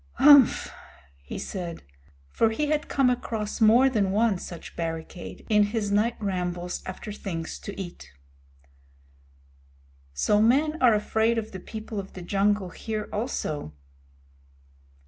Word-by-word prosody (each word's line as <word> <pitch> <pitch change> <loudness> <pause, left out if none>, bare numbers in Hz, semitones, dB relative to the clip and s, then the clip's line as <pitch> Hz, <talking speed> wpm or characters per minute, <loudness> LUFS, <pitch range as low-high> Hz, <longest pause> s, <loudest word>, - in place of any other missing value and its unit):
"Umph!" 285 -3 +6 0.5
he 70 - -7
said, 175 -3 -6 0.5
for 225 - +3
he 290 +7 -1
had 300 0 0
come 270 -2 +3
across 225 -4 -2
more 230 +5 +6
than 215 -7 +1
one 210 -1 +2
such 170 -2 -9
barricade 165 +1 -6
in 210 -2 +4
his 205 -1 -2
night 215 +4 +2
rambles 180 -3 -3
after 185 +3 -6
things 165 -6 -5
to 200 - -8
eat. 175 - -8 2.0
"So 140 - +2
men 295 +8 +2
are 240 -4 +6
afraid 220 +2 +1
of 220 -1 -3
the 190 - -7
People 220 +2 -6
of 195 - -8
the 180 - -8
Jungle 200 +1 +1
here 215 -1 -5
also." 155 - -3
210 Hz, 130 wpm, -26 LUFS, 180-230 Hz, 2.0 s, Umph